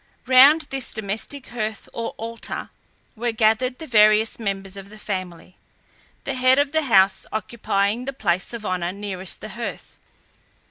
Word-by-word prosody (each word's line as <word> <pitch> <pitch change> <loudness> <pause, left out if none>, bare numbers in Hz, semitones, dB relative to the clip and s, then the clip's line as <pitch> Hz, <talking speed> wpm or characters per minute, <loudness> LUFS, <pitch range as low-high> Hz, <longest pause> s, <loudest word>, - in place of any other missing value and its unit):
Round 265 +5 +7
this 270 -2 -3
domestic 220 +6 -4
hearth 220 -3 -4
or 230 0 -4
altar 230 +1 -5 0.4
were 235 +1 -1
gathered 225 +3 +2
the 320 - -8
various 215 -3 +4
members 195 -2 -3
of 195 0 -8
the 215 - -12
family, 185 -3 -6 0.7
the 275 - -3
head 255 0 +4
of 285 0 +2
the 315 -1 +1
house 195 -5 +4
occupying 215 0 -1
the 275 - -2
place 180 -9 -1
of 230 -3 -7
honour 180 -1 -1
nearest 195 -2 -6
the 215 - -7
hearth. 235 +1 -7
220 Hz, 150 wpm, -23 LUFS, 200-250 Hz, 0.7 s, Round